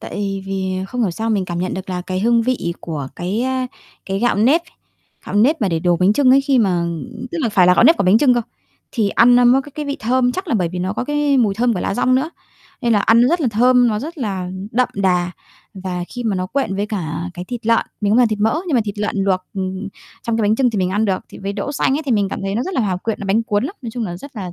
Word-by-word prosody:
Tại 195 -1 -4
vì 190 -1 -2 0.2
không 250 +2 -2
hiểu 200 - +1
sao 225 +6 -3
mình 200 -4 +1
cảm 175 -1 -4
nhận 185 +1 -2
được 190 0 -6
là 180 -1 -3
cái 185 +1 -3
hương 230 +2 +3
vị 225 -9 -1
của 150 -5 -5
cái, 195 +7 -2
a, 260 0 -1 0.4
cái 195 0 -2
gạo 240 0 +1
nếp, 265 +11 +3 0.6
gạo - - -5
nếp 265 +8 +3
mà 200 - +2
để 165 -2 0
đồ 175 0 +2
bánh 185 +3 +3
chưng 260 +2 +3
ấy 270 +2 +6
khi 275 -1 +2
mà 190 -6 +2
ưm, 220 +9 -5
tức 340 - -3
là 235 - +1
phải 185 -4 +4
là 180 - +6
gạo - - +4
nếp 325 +6 +7
của - - 0
bánh 190 +4 +5
chưng 255 -1 +4
cơ, 240 - +1 0.5
thì 220 -5 +1
ăn 245 +1 +5
nó 245 - +5
mới 255 +3 +5
có 290 - -13
cái 300 - -4
vị 280 0 -2
thơm, 250 +2 +1
chắc 375 +4 -5
là 290 - 0
bởi 180 -6 +1
vì 180 +1 -6
nó 185 +2 -2
có 240 - -3
cái 295 0 +1
mùi 215 -5 +2
thơm 235 +2 +1
của 180 - -3
lá - - -1
dong 255 +2 +2
nữa. 275 +5 0 0.5
Nên 235 -2 +2
là 210 - +4
ăn 225 +3 +4
nó 245 - +4
rất 345 +3 +1
là 275 - +2
thơm, 245 +3 +4
nó 210 -2 0
rất 315 +8 -7
là 190 -7 -3 0.2
đậm 250 +2 +2
đà 180 -3 +1 0.4
và 185 -2 -4
khi 245 -1 -6
mà 210 -4 0
nó 185 0 -2
quện 205 -3 -2
với 205 - -1
cả 175 -4 -4
cái 180 - -6
thịt 235 +2 -7
lợn, 230 0 +3
mình 205 0 +1
không 230 - +4
làm 245 -2 +5
thịt 215 -1 -2
mỡ 220 +9 +2
nhưng 305 - 0
mà 245 - +4
thịt 205 0 -5
lợn 210 0 -2
luộc, 190 -2 +1
ừm, 190 -1 -3
ừ, 205 - -5 0.3
trong 230 -1 -1
cái - - +1
bánh 215 +1 +2
chưng 255 -3 +2
thì 215 - -2
mình 185 -1 0
ăn 205 +3 +1
được, 195 -3 0
thì - - -12
với 200 0 -4
đỗ 210 +8 -4
xanh 275 -1 +1
ấy - - -4
thì 255 - +1
mình 205 -2 +2
cảm - - -4
thấy 195 0 -2
nó 235 - 0
rất 380 - -4
là - - +1
hòa 195 -5 0
quyện, 215 +4 -4
nó 200 - -5
bánh 210 +4 +2
cuốn 205 0 0
lắm. 355 - -5
Nói 235 - -5
chung 235 0 -3
là 175 -4 -5
rất 270 +7 -12
là 185 -4 -5
215 Hz, 310 wpm, -19 LUFS, 190-250 Hz, 0.6 s, nếp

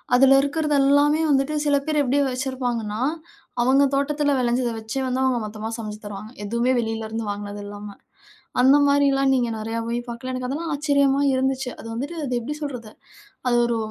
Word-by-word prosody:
அதில 270 +1 +6
இருக்கிறது 300 +1 0
எல்லாமே 290 +3 +4
வந்துட்டு 275 +2 +1
சில 290 -1 +3
பேர் 300 -1 +2
எப்படி 275 +2 +1
வச்சிருப்பாங்கன்னா, 245 -4 -3 0.6
அவங்க 265 +3 +4
தோட்டத்தில 290 +1 +1
விளைஞ்சதை 240 -1 0
வச்சே 220 +5 -4
வந்து 255 +1 -1
அவங்க, 255 -2 +2
மொத்தமா 215 +1 -6
சமைச்சு 215 -1 -7
தருவாங்க. 205 +2 -7
எதுவுமே 235 +4 +1
வெளிலேருந்து 225 0 -3
வாங்கினது 205 0 -6
இல்லாம, 205 0 -8 0.7
அந்த 265 +3 +6
மாதிரிலாம் 275 -1 +3
நீங்க 245 -2 +1
நிறையா 225 +1 -4
போய் 235 +1 -1
பார்க்கலாம். 240 +2 -5
எனக்கு 255 0 -3
அதெல்லாம் 320 +4 -3
ஆச்சரியமாக 280 -1 +2
இருந்துச்சு! 265 0 0
அது - - -10
வந்துட்டு 280 +8 -4
அது 255 - -4
எப்படி 285 +6 -4
சொல்றது. 250 -7 -6 0.6
அது 240 -1 +3
ஒரு 235 -1 0
255 Hz, 165 wpm, -23 LUFS, 230-280 Hz, 0.7 s, அதில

